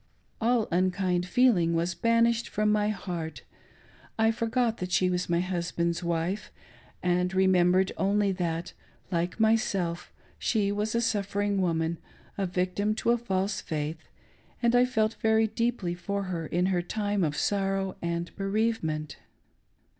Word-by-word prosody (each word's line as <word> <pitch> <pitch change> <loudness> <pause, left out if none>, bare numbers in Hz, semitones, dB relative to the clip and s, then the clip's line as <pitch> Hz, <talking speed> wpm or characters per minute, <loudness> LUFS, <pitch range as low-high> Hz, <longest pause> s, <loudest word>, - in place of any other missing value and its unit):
All 230 -1 +2
unkind 180 0 +1
feeling 185 -8 +3
was 170 +2 0
banished 230 +2 +2
from 210 0 +1
my 210 0 +2
heart 175 -6 -5 0.4
— - - -28 0.3
I 220 0 +4
forgot 230 +1 0
that 180 0 -5
she 180 0 +3
was 180 0 -1
my 170 0 +2
husband's 170 -1 -2
wife,, 170 +4 -2 0.5
and 180 0 +1
remembered 185 0 +4
only 200 +1 +2
that, 175 -2 -3 0.4
like 175 +4 -1
myself, 195 -6 +1 0.3
she 205 -3 +1
was 210 +2 -1
a 235 - +2
suffering 205 -2 0
woman, 165 -2 0 0.4
a 195 -1 -1
victim 185 +4 0
to 230 - +1
a 240 - +3
false 195 -3 -1
faith; 155 0 -4 0.5
and 235 0 +2
I 245 +1 +6
felt 220 -3 0
very 220 0 +4
deeply 220 -4 -1
for 200 +3 -3
her 170 -4 -4
in 180 +2 +1
her 175 - +1
time 205 +1 -1
of 150 -2 -1
sorrow 195 -1 0
and 170 0 -3
bereavement. 195 -7 -1
190 Hz, 145 wpm, -28 LUFS, 175-215 Hz, 0.5 s, I